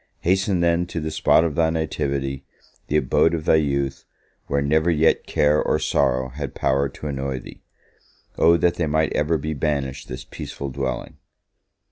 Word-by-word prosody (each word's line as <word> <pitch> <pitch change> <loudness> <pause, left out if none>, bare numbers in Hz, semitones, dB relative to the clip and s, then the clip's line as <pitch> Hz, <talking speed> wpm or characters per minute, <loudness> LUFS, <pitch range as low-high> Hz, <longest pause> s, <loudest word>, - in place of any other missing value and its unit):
Hasten, 95 0 +1
then, 85 +1 +2
to 85 - -4
the 80 0 -4
spot 80 +1 +3
of 85 -3 -1
thy 80 0 +2
nativity, 70 -4 -2 0.4
the 75 - +1
abode 80 +4 +2
of 80 -2 -5
thy - - +5
youth, 70 -3 -1 0.4
where 70 - 0
never 80 +4 +2
yet 80 -1 +2
care 75 +1 +2
or - - +1
sorrow 65 +1 +1
had 70 +1 -6
power 70 +1 +1
to 70 - -11
annoy 70 -2 -3
thee. - - -11 0.7
O 85 +1 +5
that 85 0 +1
they 85 - 0
might 80 +1 +1
ever 75 +2 +1
be 80 +2 -3
banished 70 -2 -2
this 65 +1 -7
peaceful 70 - -7
dwelling! 65 -1 -4
75 Hz, 170 wpm, -22 LUFS, 70-80 Hz, 0.7 s, thy